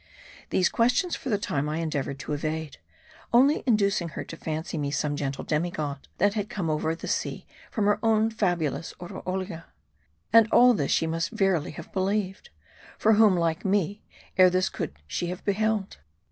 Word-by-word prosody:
These 180 - +3
questions 250 +10 +2
for 270 - -6
the 210 - +2
time 150 -7 -2
I 155 - -2
endeavored 150 -4 -2
to 150 - -4
evade; 155 +1 -3 0.5
only 270 +5 +5
inducing 200 -6 +2
her 150 - -5
to - - -9
fancy 160 +2 -4
me 145 -1 -1
some 145 +1 -1
gentle 140 -2 -3
demi 155 +3 0
god, 145 -4 -5
that 205 +2 +3
had 210 -1 -3
come 170 -6 -2
over 155 +1 0
the - - -8
sea - - -2 0.2
from 210 - -1
her 205 0 +3
own 225 0 +3
fabulous 170 -8 -1
Oroolia. 185 -1 -5 0.7
And 230 -1 +8
all 250 0 +7
this 145 -10 -1
she - - +2
must 165 +1 -1
verily 190 -6 +1
have 170 - -10
believed. 195 0 -1 0.5
For 220 - +4
whom, 210 -3 +5
like 165 0 0
me, 200 +1 0 0.4
ere 185 0 +8
this 185 +1 +1
could - - -4
she 125 - -3
have 180 +1 -6
beheld 210 0 0
180 Hz, 175 wpm, -26 LUFS, 160-210 Hz, 0.7 s, And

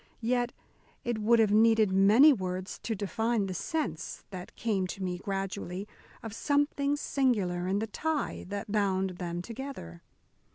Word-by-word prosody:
Yet 245 +1 +1 0.5
it 240 -2 -1
would 230 +2 +4
have 220 -2 +4
needed 220 -1 +5
many 210 +10 +7
words 185 -3 -4
to 225 - -3
define 220 +2 0
the 190 - -4
sense, 180 - -3
that 180 -2 -8
came 200 -5 0
to 190 +1 -6
me 180 -1 -2
gradually, 195 -1 -4 0.4
of 225 -2 -6
something 285 +2 +1
singular 205 -12 0
in 195 +2 +1
the 215 - 0
tie 300 +7 -2
that 200 +1 -5
bound 190 -3 0
them 175 -1 -3
together. 230 - -7
205 Hz, 150 wpm, -30 LUFS, 185-235 Hz, 0.5 s, many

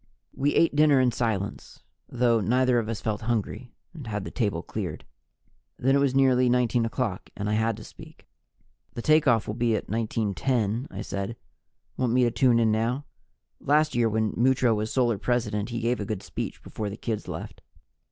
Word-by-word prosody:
We 140 +2 0
ate 165 -3 +3
dinner 150 -2 +5
in 125 -1 +3
silence, 110 -4 -3 0.3
though 120 -2 +2
neither 125 +2 +2
of 110 -1 -4
us 115 - -4
felt 110 -2 -2
hungry, 120 +2 -3 0.2
and 150 -8 -9
had 105 -2 -3
the - - -6
table 100 -8 -1
cleared. - - -5 0.7
Then 135 +2 +2
it - - +4
was 140 -2 +1
nearly 130 -2 +4
19 120 -1 +2
o'clock 110 -5 -3
and 105 0 -3
I 105 - 0
had 110 0 +1
to 110 - -10
speak. - - -14 0.7
"The 120 - -5
takeoff 140 -8 +4
will 105 - -3
be 115 0 +1
at - - -3
19:10," 115 +2 -1
I - - -6
said. 100 +3 -4 0.6
"Want 125 -2 0
me 125 0 +4
to 120 - +2
tune 125 -2 +3
in 115 -2 +3
now? 120 +6 0 0.5
Last 150 +2 +2
year, 120 -1 +2
when 110 0 0
Mutro 125 -1 +3
was 110 0 -2
Solar 120 -5 +1
President, 110 -3 -1
he 120 -1 -3
gave 120 +1 0
a 105 - -3
good 100 -2 -4
speech - - -6
before 105 -2 -5
the 100 - -7
kids 110 -3 -4
left." - - -7
115 Hz, 190 wpm, -26 LUFS, 110-125 Hz, 0.7 s, dinner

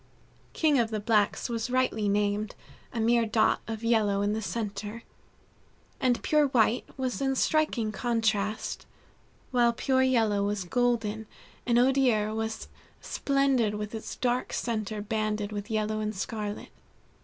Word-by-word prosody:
King 300 -4 +3
of 230 -2 +1
the 215 -1 -2
Blacks 210 -1 +1
was 230 -1 -3
rightly 250 -5 +1
named, 205 +1 0 0.4
a 235 - -4
mere 230 0 +3
dot 220 0 +2
of 225 0 -5
yellow 210 -4 +2
in 205 +1 +1
the 220 - -2
center, 210 +1 -4 1.0
and 250 -2 +1
Pure 300 -1 +3
White 240 -2 +2
was 260 0 -2
in 270 -1 +1
striking 265 -7 +1
contrast, 215 -1 -1 0.6
while 240 -2 +3
Pure 260 +2 +1
Yellow 225 -6 +2
was 205 -1 -1
golden, 220 0 0 0.4
and 240 -1 +3
Odier 245 -4 +3
was 220 0 -3 0.3
splendid 270 -6 +1
with 210 +1 -5
its 220 - -6
dark 250 0 -1
center 215 -2 -2
banded 215 -1 -2
with 205 +1 -5
yellow 215 -1 -1
and 215 0 -2
scarlet. 210 +1 -4
220 Hz, 140 wpm, -28 LUFS, 210-245 Hz, 1.0 s, King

